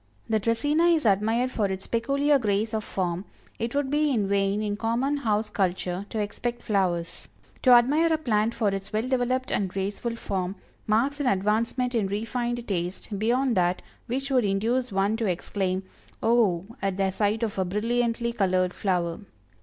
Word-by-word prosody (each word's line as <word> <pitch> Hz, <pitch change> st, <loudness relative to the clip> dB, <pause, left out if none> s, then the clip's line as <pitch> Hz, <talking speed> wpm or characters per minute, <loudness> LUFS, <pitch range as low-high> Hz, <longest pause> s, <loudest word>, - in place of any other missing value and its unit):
The 220 Hz, -1 st, +2 dB
Dracæna 290 Hz, +10 st, +2 dB
is 310 Hz, -, -2 dB
admired 225 Hz, +5 st, +2 dB
for 215 Hz, -5 st, 0 dB
its 190 Hz, 0 st, -4 dB
peculiar 280 Hz, +5 st, +2 dB
grace 215 Hz, 0 st, 0 dB
of 215 Hz, -1 st, -1 dB
form 180 Hz, -3 st, -2 dB, 0.4 s
it 230 Hz, +3 st, -3 dB
would 285 Hz, -1 st, 0 dB
be 300 Hz, +1 st, +2 dB
in 220 Hz, -7 st, +1 dB
vain 200 Hz, +1 st, +1 dB
in 205 Hz, -1 st, -1 dB
common 240 Hz, +6 st, 0 dB
house 215 Hz, -4 st, 0 dB
culture 185 Hz, -1 st, -1 dB
to 225 Hz, -, -5 dB
expect 235 Hz, +3 st, -3 dB
flowers. 180 Hz, -5 st, -1 dB, 0.3 s
To 255 Hz, -, +3 dB
admire 280 Hz, +7 st, +5 dB
a 320 Hz, -, +3 dB
plant 230 Hz, -6 st, 0 dB
for 215 Hz, -3 st, +1 dB
its 195 Hz, 0 st, -4 dB
well 220 Hz, +3 st, -1 dB
developed 255 Hz, 0 st, 0 dB
and 195 Hz, -2 st, 0 dB
graceful 200 Hz, +5 st, -3 dB
form, 190 Hz, -4 st, -3 dB, 0.3 s
marks 250 Hz, +7 st, +1 dB
an 285 Hz, -, 0 dB
advancement 225 Hz, +5 st, +1 dB
in 220 Hz, -5 st, +1 dB
refined 235 Hz, +4 st, -2 dB
taste 190 Hz, +2 st, -3 dB
beyond 245 Hz, +3 st, +2 dB
that 180 Hz, 0 st, +1 dB, 0.2 s
which 270 Hz, +3 st, -3 dB
would 255 Hz, -2 st, +3 dB
induce 225 Hz, +5 st, 0 dB
one 195 Hz, +3 st, +1 dB
to 225 Hz, -2 st, -1 dB
exclaim, 185 Hz, +1 st, -1 dB, 0.4 s
"Oh!" 220 Hz, -7 st, +3 dB, 0.2 s
at 195 Hz, -1 st, -1 dB
the 195 Hz, -1 st, +1 dB
sight 210 Hz, +3 st, 0 dB
of 210 Hz, -3 st, -2 dB
a -, -, +3 dB
brilliantly 235 Hz, +4 st, 0 dB
colored 185 Hz, -4 st, +1 dB
flower. 175 Hz, -4 st, -1 dB
215 Hz, 170 wpm, -26 LUFS, 195-245 Hz, 0.4 s, admire